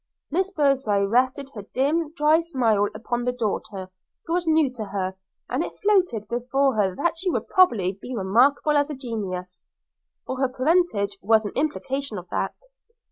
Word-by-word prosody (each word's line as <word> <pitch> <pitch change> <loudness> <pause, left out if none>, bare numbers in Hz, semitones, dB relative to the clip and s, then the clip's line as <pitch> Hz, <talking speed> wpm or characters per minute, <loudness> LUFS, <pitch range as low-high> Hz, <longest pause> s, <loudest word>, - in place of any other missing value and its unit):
Miss 375 +5 +1
Birdseye 275 - +2
rested 260 +6 +1
her 210 - -6
dim, 290 +9 0
dry 310 0 +4
smile 235 -11 +1
upon 240 +2 -3
the 250 - +1
daughter, 205 -5 -4 0.3
who 330 - -2
was 350 -1 0
new 315 -5 +3
to 225 -4 -5
her, 190 -1 -3 0.3
and - - -1
it - - -7
floated 365 - +2
before 255 +4 +1
her 195 -3 +1
that 340 - 0
she 365 +3 -1
would - - -2
probably 200 - +3
be 250 - -6
remarkable 245 +9 +3
as 290 +1 +2
a 300 - -4
genius; 190 -8 -5 0.6
her 260 0 0
parentage 255 - +1
was 220 +2 +3
an 205 - -3
implication 275 -4 -2
of 180 0 -8
that. - - -2
255 Hz, 165 wpm, -24 LUFS, 205-300 Hz, 0.6 s, dry